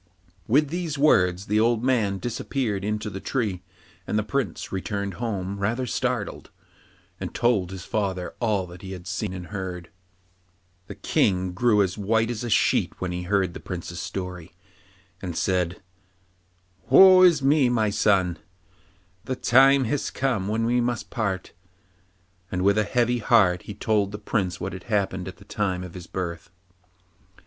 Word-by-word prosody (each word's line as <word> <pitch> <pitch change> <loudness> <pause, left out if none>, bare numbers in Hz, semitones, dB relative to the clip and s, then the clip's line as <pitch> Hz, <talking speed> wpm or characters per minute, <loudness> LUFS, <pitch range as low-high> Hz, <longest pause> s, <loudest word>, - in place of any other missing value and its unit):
With 145 +5 +3
these 165 -2 -3
words 95 -10 +3
the 105 0 +1
old 115 +1 +2
man 110 -7 +1
disappeared 115 -1 -2
into 105 +1 -2
the 95 -2 -5
tree, 105 -7 -2 0.5
and 105 - 0
the 110 - +1
Prince 110 -5 -3
returned 100 +1 -3
home 100 -4 -3
rather 115 +6 -1
startled, 125 -2 -2 0.7
and - - -6
told 110 -7 +2
his 95 -2 -8
father 95 -5 -2
all 105 -5 0
that 90 0 -12
he 95 0 -7
had 90 -2 -9
seen 95 +2 -3
and 90 -1 -6
heard. 90 -3 -6 1.0
The - - -8
King 95 -1 +1
grew 105 +1 +3
as 95 +2 -3
white 110 +3 +1
as 120 -1 -4
a 120 - -3
sheet - - +2
when 90 -1 -3
he 90 0 -3
heard 95 -2 +1
the - - -7
Prince's 85 -1 -6
story, 90 -2 -6 0.7
and 90 -3 -5
said, 90 -1 -1 1.1
'Woe 185 +6 +9
is 170 -6 +5
me, 140 -2 +4
my 110 -4 +1
son! 95 -4 +2 0.9
The 130 - -2
time 135 +3 +5
has 130 +4 -1
come 125 -8 -1
when 110 +2 0
we 120 +1 +2
must 120 -1 -2
part,' 100 -6 -2 1.0
and 90 0 -1
with 100 +2 +4
a 105 - +1
heavy 120 +2 +1
heart 105 -6 +4
he 105 - -8
told 105 -2 0
the 105 - -5
Prince 100 -3 -2
what 95 +2 -4
had 95 -2 -9
happened 95 -4 -1
at 95 - -8
the 100 - -16
time 95 -3 -2
of 90 -2 -9
his 90 -2 -9
birth. 85 -3 -5
100 Hz, 165 wpm, -25 LUFS, 95-120 Hz, 1.1 s, Woe